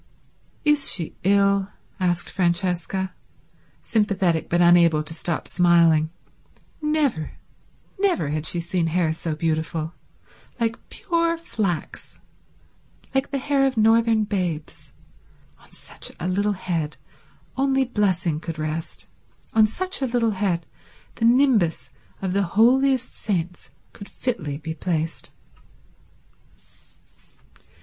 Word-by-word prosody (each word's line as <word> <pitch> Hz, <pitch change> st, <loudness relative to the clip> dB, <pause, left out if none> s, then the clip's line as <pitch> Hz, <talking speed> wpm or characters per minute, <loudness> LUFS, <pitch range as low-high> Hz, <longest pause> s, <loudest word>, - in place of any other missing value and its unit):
"Is 295 Hz, -2 st, +4 dB
she 165 Hz, -4 st, -2 dB
ill?" 200 Hz, 0 st, +3 dB, 0.3 s
asked 175 Hz, -2 st, 0 dB
Francesca, 180 Hz, +1 st, 0 dB, 0.7 s
sympathetic 195 Hz, -7 st, +1 dB
but 175 Hz, -, +2 dB
unable 170 Hz, -3 st, +5 dB
to 160 Hz, +2 st, -7 dB
stop 165 Hz, 0 st, -2 dB
smiling. 170 Hz, -3 st, +4 dB, 0.7 s
Never, 300 Hz, -, 0 dB, 0.7 s
never 370 Hz, -, +1 dB
had 155 Hz, +1 st, -1 dB
she 175 Hz, -, +1 dB
seen 170 Hz, 0 st, -1 dB
hair 165 Hz, -1 st, +1 dB
so 160 Hz, -1 st, -3 dB
beautiful. 160 Hz, 0 st, -2 dB, 0.7 s
Like 230 Hz, 0 st, -2 dB
pure 335 Hz, -2 st, 0 dB
flax; 205 Hz, -, -4 dB, 1.0 s
like 270 Hz, +1 st, 0 dB
the 280 Hz, -, -2 dB
hair 275 Hz, +1 st, +1 dB
of 260 Hz, -3 st, -3 dB
northern 225 Hz, 0 st, +4 dB
babes. 180 Hz, -7 st, -4 dB, 0.7 s
On -, -, -22 dB
such -, -, -7 dB
a 175 Hz, -, -3 dB
little 200 Hz, +3 st, +1 dB
head 165 Hz, -5 st, -3 dB, 0.6 s
only 270 Hz, 0 st, +2 dB
blessing 185 Hz, -9 st, 0 dB
could 165 Hz, -1 st, -6 dB
rest, 155 Hz, +1 st, -4 dB, 0.5 s
on 220 Hz, -1 st, +5 dB
such 370 Hz, -, -3 dB
a 265 Hz, -, +1 dB
little 235 Hz, -2 st, +1 dB
head 185 Hz, -5 st, -1 dB, 0.5 s
the 230 Hz, -, -1 dB
nimbus 220 Hz, -, +3 dB, 0.3 s
of 185 Hz, -1 st, -1 dB
the 200 Hz, -, +2 dB, 0.2 s
holiest 260 Hz, +2 st, +3 dB
saints 180 Hz, -4 st, -3 dB, 0.2 s
could 200 Hz, -, -11 dB
fitly 155 Hz, -, -3 dB
be 160 Hz, +1 st, -5 dB
placed. 165 Hz, -1 st, -3 dB
185 Hz, 110 wpm, -23 LUFS, 165-230 Hz, 1.0 s, unable